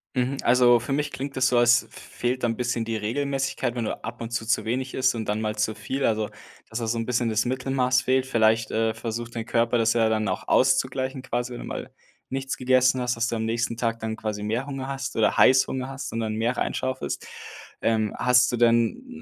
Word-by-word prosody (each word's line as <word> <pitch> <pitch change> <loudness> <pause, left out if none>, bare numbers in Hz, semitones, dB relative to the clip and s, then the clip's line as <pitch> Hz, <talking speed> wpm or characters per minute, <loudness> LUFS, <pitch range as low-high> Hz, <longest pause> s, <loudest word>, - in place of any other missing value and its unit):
Mhm. 130 +2 0
Also 120 0 +5
für 125 +4 -3
mich 150 +1 -1
klingt 135 +1 -5
das 130 0 +3
so, 125 - +2
als 120 +1 +5
f - - -23
fehlt 125 +1 -4
dann 120 - +2
'n - - -3
bisschen 120 -2 -1
die 115 0 -2
Regelmäßigkeit. 135 +2 -1
Wenn 120 -2 -2
du - - -4
ab 115 +1 -6
und 115 - -4
zu 115 -1 -2
zu 115 - +1
wenig 130 +3 -2
isst 130 -1 +2
und 110 -1 -3
dann 105 +1 -1
mal 105 -1 -2
zu 105 +1 0
viel, 135 +4 -3
also 110 -1 0 0.4
dass 110 - -5
da 115 - -3
so 115 +1 0
'n 115 - -2
bisschen 120 -1 +1
das 110 +1 +1
Mittelmaß 130 0 +1
fehlt. 130 0 +1
Vielleicht, 110 -2 +2
äh, 110 0 0
versucht 115 +1 -5
dein 115 -1 -3
Körper 115 0 +2
das 115 0 +3
ja 115 -2 +3
dann 110 -1 0
auch 95 0 -3
auszugleichen, 130 0 +1
quasi, 120 -1 -3
wenn 120 - -7
du - - -7
mal - - -6 0.4
nichts 135 0 -3
gegessen 130 0 +3
hast, 125 0 0
dass 115 0 0
du 120 - -2
am 110 0 -2
nächsten 115 0 -1
Tag 115 -1 -1
dann 110 0 -3
quasi 105 -2 -4
mehr 115 +5 -1
Hunger 135 -2 -5
hast 135 -3 -4
oder 110 - +2
Heißhunger 130 0 +4
hast 135 0 -6
und 115 - -2
dann 110 -1 -2
mehr 115 +3 0
rein - - -1
schaufelst. 130 0 -3 0.6
Ähm, 110 -2 +1
hast 125 0 +4
du 120 - -1
denn, 115 - +2
120 Hz, 235 wpm, -25 LUFS, 115-130 Hz, 0.6 s, Also